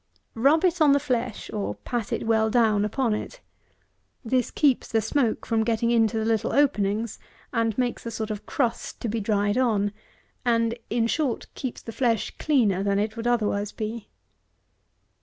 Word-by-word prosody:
Rub 285 Hz, +9 st, +3 dB
it 355 Hz, -1 st, +1 dB
on 295 Hz, -2 st, +6 dB
the 285 Hz, -, +4 dB
flesh, 245 Hz, -4 st, -2 dB
or 210 Hz, -2 st, -2 dB
pat 240 Hz, -4 st, -4 dB
it -, -, -2 dB
well 220 Hz, -1 st, +2 dB
down 215 Hz, -3 st, +3 dB
upon 230 Hz, +1 st, 0 dB
it. -, -, -5 dB, 0.9 s
This 250 Hz, +2 st, +1 dB
keeps 280 Hz, -5 st, +2 dB
the 225 Hz, -, +1 dB
smoke 225 Hz, +2 st, 0 dB
from 225 Hz, -1 st, +1 dB
getting 230 Hz, +1 st, +1 dB
into 225 Hz, -1 st, +3 dB
the 220 Hz, -, 0 dB
little 225 Hz, -2 st, 0 dB
openings, 220 Hz, -6 st, +1 dB, 0.3 s
and 225 Hz, -2 st, 0 dB
makes 250 Hz, -2 st, -1 dB
a -, -, -1 dB
sort 220 Hz, -1 st, -4 dB
of 210 Hz, -1 st, -6 dB
crust 245 Hz, -5 st, -2 dB
to -, -, -2 dB
be 225 Hz, +1 st, -1 dB
dried 205 Hz, +1 st, +1 dB
on; 210 Hz, -5 st, +2 dB, 0.5 s
and, 230 Hz, -1 st, +2 dB, 0.2 s
in 230 Hz, 0 st, +1 dB
short, 265 Hz, +1 st, -1 dB
keeps 260 Hz, -3 st, -5 dB
the 230 Hz, -, -6 dB
flesh 230 Hz, -2 st, 0 dB
cleaner 225 Hz, -11 st, +2 dB
than 200 Hz, 0 st, +1 dB
it 210 Hz, +1 st, -1 dB
would 230 Hz, 0 st, -3 dB
otherwise 210 Hz, -4 st, 0 dB
be. 220 Hz, 0 st, -5 dB
230 Hz, 175 wpm, -25 LUFS, 215-245 Hz, 0.9 s, on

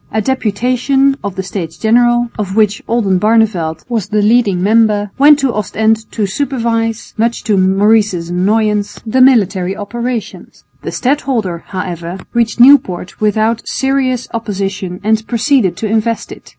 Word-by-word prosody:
A 220 Hz, -, -1 dB
deputation 255 Hz, +4 st, 0 dB
of 200 Hz, -2 st, -4 dB
the 190 Hz, -, -4 dB
States 180 Hz, -4 st, -6 dB
General, 240 Hz, +1 st, +2 dB
of 195 Hz, -2 st, -3 dB
which 215 Hz, -1 st, +1 dB
Oldenbarneveldt 205 Hz, -6 st, +1 dB
was 230 Hz, -6 st, -2 dB
the 210 Hz, -1 st, 0 dB
leading 210 Hz, -5 st, +2 dB
member, 210 Hz, -1 st, +2 dB
went 290 Hz, +1 st, +7 dB
to 270 Hz, -4 st, -1 dB
Ostend 220 Hz, +1 st, -1 dB
to 215 Hz, -, -1 dB
supervise, 230 Hz, -1 st, -2 dB
much 230 Hz, +2 st, -1 dB
to 210 Hz, -, +1 dB
Maurice's 195 Hz, -2 st, +2 dB
annoyance, 210 Hz, +3 st, 0 dB
the 255 Hz, +4 st, +1 dB
military 195 Hz, -7 st, +3 dB
operations. 235 Hz, +1 st, -6 dB, 0.2 s
The -, -, -5 dB
stadholder, 245 Hz, -, -2 dB
however, 180 Hz, -2 st, -5 dB, 0.2 s
reached 235 Hz, 0 st, 0 dB
Nieuport 240 Hz, -10 st, +4 dB
without 220 Hz, +2 st, 0 dB
serious 265 Hz, -2 st, -1 dB
opposition 195 Hz, -4 st, -4 dB
and 220 Hz, +1 st, 0 dB
proceeded 240 Hz, -4 st, +1 dB
to 220 Hz, -, -3 dB
invest 225 Hz, +1 st, -1 dB
it. -, -, -12 dB
220 Hz, 135 wpm, -14 LUFS, 195-240 Hz, 0.2 s, went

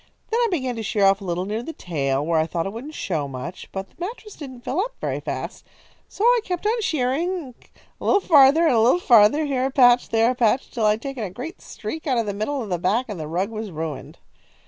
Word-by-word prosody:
Then 460 Hz, -, +2 dB
I 475 Hz, -, +3 dB
began 260 Hz, -, -2 dB
to -, -, -3 dB
shear 205 Hz, -1 st, +1 dB
off 195 Hz, +1 st, +4 dB
a -, -, -8 dB
little 180 Hz, 0 st, -2 dB
near 215 Hz, +3 st, -3 dB
the 325 Hz, +7 st, -7 dB
tail, 140 Hz, -, -2 dB
where 165 Hz, 0 st, +2 dB
I 160 Hz, -, +1 dB
thought 165 Hz, -1 st, -2 dB
it 195 Hz, -, -4 dB
wouldn't 280 Hz, +7 st, -8 dB
show 155 Hz, -7 st, -2 dB
much; 135 Hz, +7 st, -7 dB
but 195 Hz, 0 st, -5 dB
the -, -, -31 dB
mattress 425 Hz, +3 st, -6 dB
didn't 260 Hz, -5 st, -9 dB
fill 270 Hz, +7 st, -2 dB
up -, -, -2 dB
very -, -, -2 dB
fast. -, -, -5 dB, 0.5 s
So 405 Hz, -, -5 dB
I 485 Hz, +1 st, +5 dB
kept 360 Hz, +1 st, -4 dB
on 455 Hz, +2 st, +1 dB
shearing, 315 Hz, -, -1 dB, 0.5 s
a -, -, -10 dB
little 400 Hz, -, +4 dB
farther 310 Hz, -2 st, +6 dB
and 320 Hz, -, +4 dB
a -, -, +4 dB
little 245 Hz, +10 st, +4 dB
farther, 245 Hz, +2 st, +5 dB
here 265 Hz, -3 st, 0 dB
a -, -, -3 dB
patch 245 Hz, -2 st, +5 dB
and -, -, -23 dB
there 225 Hz, +2 st, +4 dB
a -, -, -1 dB
patch, 245 Hz, +1 st, +2 dB
until 225 Hz, -3 st, -1 dB
I -, -, +5 dB
had 225 Hz, -, -18 dB
taken 275 Hz, -4 st, -4 dB
a 200 Hz, -, -3 dB
great 260 Hz, -, -8 dB
streak 315 Hz, 0 st, -7 dB
out 260 Hz, -3 st, +1 dB
of 230 Hz, -, +1 dB
the 205 Hz, -, -3 dB
middle 240 Hz, +7 st, -2 dB
of 215 Hz, -, -8 dB
the 175 Hz, -2 st, -1 dB
back, 210 Hz, +9 st, +1 dB
and 200 Hz, -5 st, -5 dB
the 155 Hz, -, -5 dB
rug 180 Hz, +7 st, -2 dB
was 215 Hz, -1 st, -5 dB
ruined." 155 Hz, -5 st, -6 dB
240 Hz, 260 wpm, -23 LUFS, 195-305 Hz, 0.5 s, farther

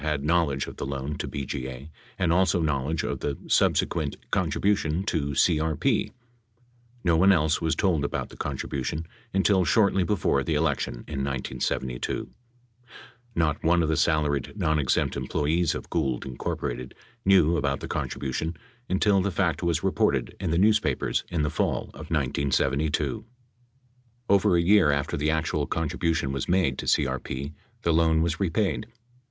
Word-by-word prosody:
had 75 Hz, -2 st, -1 dB
knowl 85 Hz, -1 st, +2 dB
edge 70 Hz, 0 st, -2 dB
of -, -, -10 dB
the -, -, -4 dB
loan 70 Hz, +1 st, -3 dB
to -, -, -4 dB
BGA 65 Hz, -1 st, -5 dB, 0.3 s
and 85 Hz, -3 st, +2 dB
also 90 Hz, 0 st, +3 dB
knowledge 75 Hz, 0 st, -1 dB
of -, -, -3 dB
the 70 Hz, -2 st, -3 dB
subsequent 80 Hz, -4 st, +1 dB, 0.2 s
con -, -, +1 dB
tribution 95 Hz, -3 st, 0 dB
to 70 Hz, -6 st, -1 dB
CRP. 80 Hz, 0 st, +1 dB, 0.9 s
No 85 Hz, -2 st, +3 dB
one 95 Hz, +4 st, +5 dB
else 80 Hz, -4 st, +2 dB
was 80 Hz, -, +1 dB
told 85 Hz, -7 st, +1 dB
about 70 Hz, -, -3 dB
the -, -, -13 dB
contribution 70 Hz, +2 st, -3 dB, 0.3 s
until 95 Hz, 0 st, +3 dB
shortly 100 Hz, 0 st, +3 dB
before 90 Hz, -7 st, +1 dB
the 80 Hz, -, -1 dB
election 80 Hz, +2 st, 0 dB
in 70 Hz, -3 st, -3 dB
1972. 65 Hz, -2 st, -3 dB, 1.1 s
Not 75 Hz, -3 st, 0 dB
one 85 Hz, +1 st, +3 dB
of 80 Hz, -, 0 dB
the 80 Hz, -, +2 dB
salaried 75 Hz, -3 st, +1 dB
nonexempt 80 Hz, -7 st, +1 dB
employees 80 Hz, +3 st, 0 dB
of -, -, -8 dB
Gould, 65 Hz, -3 st, -1 dB
Inc., 65 Hz, -1 st, -4 dB, 0.3 s
knew 90 Hz, -4 st, +5 dB
about 70 Hz, -2 st, 0 dB
the -, -, -6 dB
contribution 75 Hz, +5 st, -3 dB, 0.3 s
until 95 Hz, +1 st, +3 dB
the 100 Hz, -, 0 dB
fact 90 Hz, -3 st, 0 dB
was 85 Hz, -3 st, 0 dB
reported -, -, +1 dB
in 95 Hz, -2 st, -2 dB
the 85 Hz, -, +1 dB
newspapers 100 Hz, -8 st, +2 dB
in 80 Hz, -3 st, -1 dB
the 75 Hz, -, 0 dB
fall -, -, -1 dB
of -, -, -10 dB
1972. 70 Hz, -, 0 dB, 1.0 s
553 100 Hz, -, +5 dB
Over 95 Hz, -2 st, +3 dB
a -, -, +3 dB
year 95 Hz, -3 st, +5 dB
after 70 Hz, -1 st, -1 dB
the 75 Hz, +2 st, 0 dB
actual 80 Hz, -1 st, 0 dB
contribution 80 Hz, -2 st, -1 dB
was 70 Hz, -1 st, -3 dB
made 85 Hz, -8 st, +2 dB
to -, -, -5 dB
CRP, 65 Hz, +1 st, -1 dB, 0.3 s
the 85 Hz, -, +2 dB
loan 80 Hz, 0 st, +3 dB
was 85 Hz, -1 st, -1 dB
repaid. 100 Hz, +1 st, 0 dB
80 Hz, 155 wpm, -26 LUFS, 70-85 Hz, 1.1 s, one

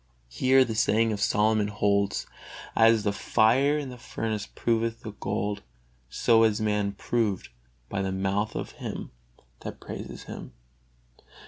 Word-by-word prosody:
Here 130 Hz, -, +4 dB
the 115 Hz, -, -3 dB
saying 110 Hz, +1 st, +2 dB
of 105 Hz, -, -4 dB
Solomon 105 Hz, +1 st, +3 dB
holds: 100 Hz, -1 st, +1 dB, 0.5 s
"As 115 Hz, -1 st, +5 dB
the 100 Hz, -1 st, +1 dB
fire 130 Hz, +9 st, +3 dB
in 145 Hz, -3 st, -4 dB
the 125 Hz, -1 st, -9 dB
furnace 110 Hz, -3 st, -3 dB
proveth 115 Hz, 0 st, -1 dB
the 110 Hz, -, -6 dB
gold, 105 Hz, +1 st, -3 dB, 0.5 s
so 115 Hz, -, +3 dB, 0.2 s
man 105 Hz, -1 st, +1 dB
is 100 Hz, -, -4 dB
proved 110 Hz, -6 st, -1 dB, 0.4 s
by 100 Hz, -, -2 dB
the 95 Hz, -1 st, -1 dB
mouth 95 Hz, +2 st, -1 dB
of -, -, -4 dB
him -, -, -6 dB, 0.5 s
that -, -, -7 dB
praises -, -, -7 dB
him." -, -, -9 dB
110 Hz, 140 wpm, -27 LUFS, 100-115 Hz, 0.5 s, As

